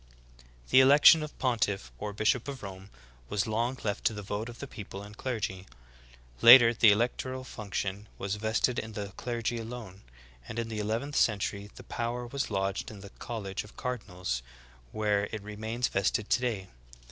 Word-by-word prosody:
9. - - -21 0.2
The 130 - +8
election 145 +4 +8
of 150 -1 -7
pontiff, 105 - 0
or 105 - -4
bishop 110 +5 +1
of 135 -4 -6
Rom.e, 95 -1 -8 0.4
was 105 -1 0
long 115 +4 -1
left 105 0 -2
to - - +3
the 105 - -6
vote 105 +4 -4
of 120 - -10
the - - -6
people 100 -6 -8
and 105 +1 -11
clergy; 105 -7 -3 0.7
later 120 0 +10
the 110 -2 +6
electoral 125 +4 -1
function 100 -3 -4
was 100 0 -3
vested 110 +3 +1
in 110 0 -7
the 100 -1 -4
clergy 120 -1 -2
alone; 115 -4 -8 0.5
and 110 - -7
in 115 -1 -2
the 110 -1 -4
eleventh 115 +8 -2
century 100 -1 +1
the - - -11
power 120 +1 -3
was 135 +3 -3
lodged 95 -1 -1
in 105 -3 -10
the 100 0 -11
college 100 -5 -5
of 105 - -16
cardinals, 90 - -3 0.5
where 105 -1 +1
it 110 -2 -5
remains 110 +4 -2
vested 100 +2 0
today. 115 -7 0
110 Hz, 170 wpm, -29 LUFS, 100-120 Hz, 0.7 s, later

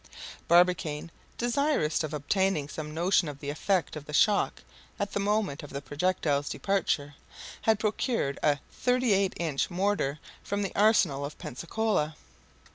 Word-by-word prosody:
Barbicane, 170 -3 +3 0.3
desirous 240 - +1
of 155 - -3
obtaining 155 +1 0
some 150 +1 -6
notion 170 +2 +2
of 145 -1 -6
the 145 0 -4
effect 180 +4 0
of 150 -1 -7
the 150 - -9
shock 205 - +3 0.4
at 200 0 -2
the - - -1
moment 200 -7 0
of 145 - -9
the 140 - -4
projectile's 145 -1 0
departure, 160 -7 -1 0.5
had 220 -1 +3
procured 215 - -1
a 145 -1 +3
38 235 -7 +2
inch 155 -5 -1
mortar 185 -6 0 0.2
from 205 0 -2
the 195 - -4
arsenal 195 -10 +3
of 145 +1 -6
Pensacola. 165 - -1
170 Hz, 140 wpm, -28 LUFS, 145-205 Hz, 0.5 s, Barbicane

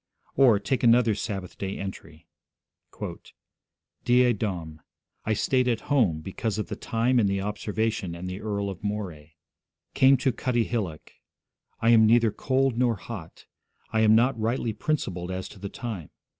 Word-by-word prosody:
Or, 125 -6 +6
take 125 +5 -1
another 120 -1 +5
Sabbath 95 -3 -5
day 95 0 -3
entry: 80 -4 -8 1.8
'Die 125 0 +4
Dom. 90 -8 -4 0.4
I 110 - +1
stayed 130 +4 +1
at 120 -2 0
home, 100 - +3
because 100 +4 -3
of 105 - -3
the - - -3
time, 120 +2 +1
and 105 -4 +3
the 100 0 0
observation, 105 -2 -2
and 90 +2 -6
the 90 +2 -5
Earl 100 -2 -2
of 95 - -11
Moray... 90 -8 -5 0.6
Came 135 +1 +5
to 130 +1 +1
Cuttiehillock. 115 -10 -2 0.7
I 115 - +4
am 110 -2 +6
neither 115 -1 +4
cold 130 +1 0
nor 120 -2 +3
hot. 95 -4 -9 0.5
I 110 - +2
am 110 0 +6
not 120 +1 +3
rightly 115 +1 -1
principled 95 - -2
as 95 0 -4
to 100 - -13
the 100 +1 -5
time. 105 - -6
110 Hz, 155 wpm, -26 LUFS, 95-120 Hz, 1.8 s, Or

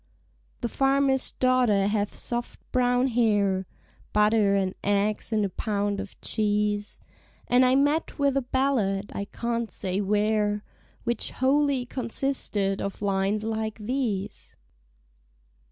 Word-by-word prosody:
The 240 - 0
farmer's 270 +1 +2
daughter 250 -6 +3
hath 205 0 -1
soft 240 0 -4
brown 245 0 +2
hair; 205 -5 +2 0.5
(Butter 210 -1 +4
and 190 -1 0
eggs 205 +2 0
and 215 -2 +2
a - - -2
pound 205 0 -2
of 200 -1 -8
cheese) 210 -1 0 0.5
And 245 +1 +5
I 255 +1 +4
met 290 +4 +1
with 280 -2 +2
a 275 - +2
ballad, 240 -7 0
I 200 - -3
can't 235 +1 -3
say 190 0 -3
where, 210 +1 +1 0.4
Which 235 -1 -1
wholly 270 -1 +1
consisted 235 -5 -2
of 200 +1 -5
lines 200 +1 0
like 220 -1 -2
these. 215 -3 -3
215 Hz, 120 wpm, -26 LUFS, 205-255 Hz, 0.5 s, And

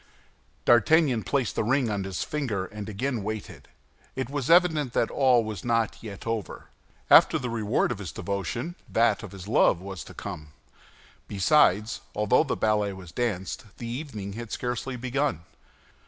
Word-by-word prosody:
D'Artagnan 125 +1 +4
placed 130 -3 -1
the - - 0
ring 130 +3 +2
on 100 -2 -2
his 95 -2 -3
finger, 120 -11 -2
and 105 +2 -7
again 120 +3 -2
waited; 110 +1 -6 0.5
it 130 0 -3
was 145 -2 -2
evident 160 -7 +4
that 115 - +1
all 130 -4 +4
was 110 -4 -6
not 115 -2 0
yet 105 -3 -9
over. 115 -3 -4 0.4
After - - +8
the 125 -2 -4
reward 110 +1 0
of 115 - -4
his 95 -4 -6
devotion, 100 - -3 0.2
that 115 +1 +2
of 105 -5 -9
his 95 -1 -10
love 95 - +4
was 95 -2 -7
to - - -12
come. 75 -1 -7 0.7
Besides, 105 0 +3
although 105 +7 +3
the 145 - -2
ballet 105 -2 +1
was 95 -3 -11
danced, 115 +1 -3
the 120 - -7
evening 115 -6 -5
had 115 +1 -7
scarcely 125 +1 -3
begun. 130 - -1
115 Hz, 160 wpm, -26 LUFS, 100-130 Hz, 0.7 s, After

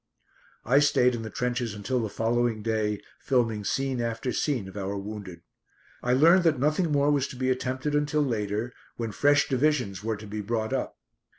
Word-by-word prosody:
I 135 +5 +5
stayed 125 -3 +4
in 120 - -3
the 110 - -6
trenches 120 -2 -2
until 125 +5 -1
the 110 - -2
following 115 +1 0
day, 110 -2 -1 0.2
filming 115 -5 0
scene 135 +4 -1
after 115 +2 -2
scene 130 -10 -1
of 95 - -11
our 100 0 -3
wounded. 100 -4 -7 0.6
I 125 - 0
learned 165 +8 +6
that 160 -4 +4
nothing 155 +5 +1
more 145 0 +3
was 140 -2 +1
to - - -9
be 130 +1 0
attempted 130 +3 -2
until 150 0 +1
later, 110 -1 -2 0.2
when 115 -2 -3
fresh 145 +5 +3
divisions 130 -8 0
were 110 -1 -1
to 105 - -10
be 105 +1 -5
brought 110 +1 -2
up. - - -2
120 Hz, 185 wpm, -27 LUFS, 105-135 Hz, 0.6 s, learned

